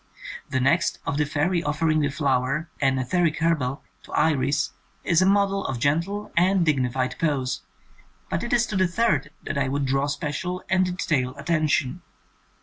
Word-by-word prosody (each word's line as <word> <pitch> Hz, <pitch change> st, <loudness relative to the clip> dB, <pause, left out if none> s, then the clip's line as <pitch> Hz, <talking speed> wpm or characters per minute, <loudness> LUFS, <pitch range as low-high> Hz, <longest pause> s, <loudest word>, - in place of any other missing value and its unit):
The 130 Hz, -, 0 dB
next, 170 Hz, +7 st, +2 dB
of 140 Hz, -, -1 dB
the 150 Hz, -, +2 dB
fairy 165 Hz, +5 st, 0 dB
offering 155 Hz, 0 st, +1 dB
a 145 Hz, -, +1 dB
flower 140 Hz, +2 st, 0 dB
— -, -, -20 dB
an 135 Hz, -1 st, +3 dB
ether 175 Hz, +8 st, 0 dB
ic 165 Hz, -2 st, +1 dB
hare 165 Hz, +1 st, +3 dB
bell 135 Hz, -3 st, -3 dB
— 90 Hz, -, -38 dB
to -, -, -14 dB
Iris, 140 Hz, -, +1 dB, 0.3 s
is 170 Hz, +1 st, +3 dB
a 185 Hz, -, +4 dB
model 195 Hz, 0 st, +2 dB
of 130 Hz, -, -2 dB
gentle 170 Hz, -, -1 dB
and 180 Hz, +1 st, +3 dB
digni 135 Hz, -6 st, +1 dB
fied 130 Hz, 0 st, -2 dB
pose, 135 Hz, -, 0 dB, 0.7 s
but -, -, -2 dB
it 235 Hz, -, -4 dB
is 240 Hz, -1 st, +3 dB
to 210 Hz, -, -5 dB
the 185 Hz, -1 st, +3 dB
third 170 Hz, -7 st, +1 dB
that 140 Hz, -, -2 dB
I 135 Hz, -, +1 dB
would 140 Hz, +1 st, -1 dB
draw 135 Hz, +1 st, +1 dB
special 150 Hz, +5 st, -3 dB
and 185 Hz, 0 st, +4 dB
detailed 130 Hz, -6 st, 0 dB
attention. 155 Hz, 0 st, 0 dB
150 Hz, 190 wpm, -24 LUFS, 135-175 Hz, 0.7 s, a